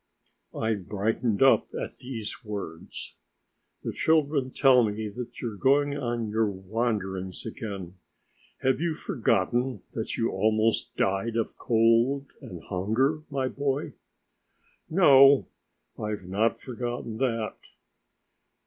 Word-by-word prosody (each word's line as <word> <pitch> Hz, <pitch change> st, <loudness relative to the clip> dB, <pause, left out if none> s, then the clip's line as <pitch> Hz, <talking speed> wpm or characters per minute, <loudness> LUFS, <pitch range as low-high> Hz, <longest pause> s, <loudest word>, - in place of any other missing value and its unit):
I 110 Hz, 0 st, +1 dB
brightened 105 Hz, +3 st, 0 dB
up 135 Hz, -, +5 dB
at -, -, -6 dB
these 125 Hz, -2 st, -6 dB
words. 100 Hz, -7 st, -6 dB, 0.7 s
"The -, -, -3 dB
children 150 Hz, -4 st, +2 dB
tell 130 Hz, -2 st, +5 dB
me 105 Hz, 0 st, -2 dB
that 120 Hz, +3 st, -8 dB
you 120 Hz, -, -3 dB
are -, -, -10 dB
going 140 Hz, +4 st, +3 dB
on 120 Hz, -5 st, -2 dB
your 110 Hz, 0 st, +2 dB
wanderings 95 Hz, -2 st, -3 dB
again. 100 Hz, -6 st, -6 dB, 0.6 s
Have 130 Hz, +2 st, +2 dB
you 170 Hz, -2 st, 0 dB
forgotten 120 Hz, -, 0 dB
that 110 Hz, -, -3 dB
you 115 Hz, -, +1 dB
almost 110 Hz, +1 st, +1 dB
died 95 Hz, +4 st, 0 dB
of 115 Hz, -1 st, -1 dB
cold 115 Hz, +4 st, +3 dB, 0.2 s
and 85 Hz, -3 st, -9 dB
hunger, 115 Hz, +11 st, 0 dB
my 135 Hz, -2 st, -1 dB
boy?" 140 Hz, +1 st, -2 dB, 1.0 s
"No, 140 Hz, -5 st, +7 dB, 0.5 s
I've 105 Hz, -3 st, -4 dB
not 105 Hz, +5 st, +1 dB
forgotten 120 Hz, -2 st, -5 dB
that." 115 Hz, -4 st, -1 dB
115 Hz, 115 wpm, -27 LUFS, 105-130 Hz, 1.0 s, No